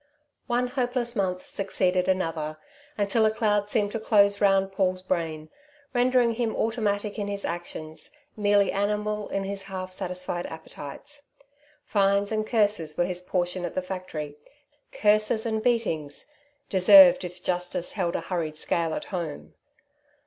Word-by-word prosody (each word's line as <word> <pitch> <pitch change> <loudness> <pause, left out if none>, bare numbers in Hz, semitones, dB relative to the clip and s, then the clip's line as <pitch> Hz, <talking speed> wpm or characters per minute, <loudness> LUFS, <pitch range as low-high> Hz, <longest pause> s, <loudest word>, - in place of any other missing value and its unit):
One 245 0 +1
hopeless 245 -2 -1
month 185 -3 -1
succeeded 185 -2 0
another, 165 -5 -1 0.4
until 205 +2 +2
a 215 - +5
cloud 210 -2 0
seemed 205 -2 +1
to 225 - -3
close 200 -2 +3
round 195 -1 +3
Paul's 185 -1 0
brain, 160 -4 -3 0.4
rendering 245 -1 +3
him 225 -1 -2
automatic 210 -2 -1
in 205 - -2
his 200 0 -3
actions, 160 -2 -6 0.3
merely 205 -1 +3
animal 210 +1 -1
in 195 - -2
his 195 0 -4
half 185 -1 -6
satisfied 180 -1 -3
appetites. 160 - -10 0.6
Fines 200 0 +2
and 215 0 -1
curses 205 -9 +1
were 175 - +2
his 180 0 -3
portion 180 0 -2
at 175 - -4
the 185 - -1
factory; 180 -6 -6 0.5
curses 215 +1 +3
and 220 -1 -1
beatings 190 -12 -1 0.4
deserved 270 +8 +8
if 180 0 -8
Justice 180 -1 -2
held 180 -4 -1
a - - -1
hurried 165 -3 -3
scale 165 0 0
at - - -5
home. 165 -5 -5
195 Hz, 140 wpm, -26 LUFS, 180-215 Hz, 0.6 s, deserved